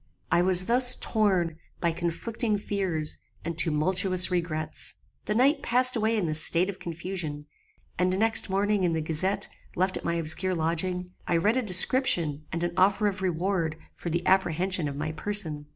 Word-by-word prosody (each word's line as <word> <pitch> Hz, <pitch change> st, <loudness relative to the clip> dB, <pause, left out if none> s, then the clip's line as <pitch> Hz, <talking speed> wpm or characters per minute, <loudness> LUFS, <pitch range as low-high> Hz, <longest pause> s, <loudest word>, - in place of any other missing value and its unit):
"I 175 Hz, -, +3 dB
was 185 Hz, 0 st, +5 dB
thus 250 Hz, +3 st, +4 dB
torn 185 Hz, -7 st, 0 dB, 0.2 s
by 170 Hz, -, 0 dB
conflicting 210 Hz, +7 st, -2 dB
fears 190 Hz, -7 st, -2 dB, 0.3 s
and 170 Hz, -, -4 dB
tumultuous 180 Hz, +4 st, +3 dB
regrets. 155 Hz, -3 st, -1 dB, 0.3 s
The 210 Hz, -, -2 dB
night 275 Hz, +5 st, +2 dB
passed 250 Hz, +1 st, +3 dB
away 225 Hz, 0 st, 0 dB
in 200 Hz, -, -1 dB
this 155 Hz, -1 st, +3 dB
state 180 Hz, +4 st, +5 dB
of 190 Hz, -, -16 dB
confusion; 170 Hz, -3 st, -6 dB, 0.5 s
and 185 Hz, +1 st, 0 dB
next 220 Hz, 0 st, +1 dB
morning 200 Hz, +1 st, 0 dB
in 170 Hz, -2 st, 0 dB
the 160 Hz, -, -2 dB
gazette 185 Hz, +6 st, -2 dB, 0.3 s
left 185 Hz, +1 st, -1 dB
at -, -, -9 dB
my 170 Hz, -, -2 dB
obscure 170 Hz, +3 st, +1 dB
lodging, 180 Hz, +3 st, -2 dB, 0.2 s
I 170 Hz, -, +1 dB
read 210 Hz, +7 st, +1 dB
a -, -, +1 dB
description 180 Hz, -, +2 dB
and 170 Hz, +1 st, -3 dB
an 175 Hz, 0 st, -2 dB
offer 195 Hz, +3 st, +2 dB
of 195 Hz, -2 st, -2 dB
reward 175 Hz, -2 st, -2 dB, 0.2 s
for 170 Hz, -, -7 dB
the 170 Hz, +1 st, -3 dB
apprehension 185 Hz, -2 st, +1 dB
of 140 Hz, -, -6 dB
my 155 Hz, +2 st, -4 dB
person. 160 Hz, -5 st, -1 dB
180 Hz, 170 wpm, -26 LUFS, 165-200 Hz, 0.5 s, was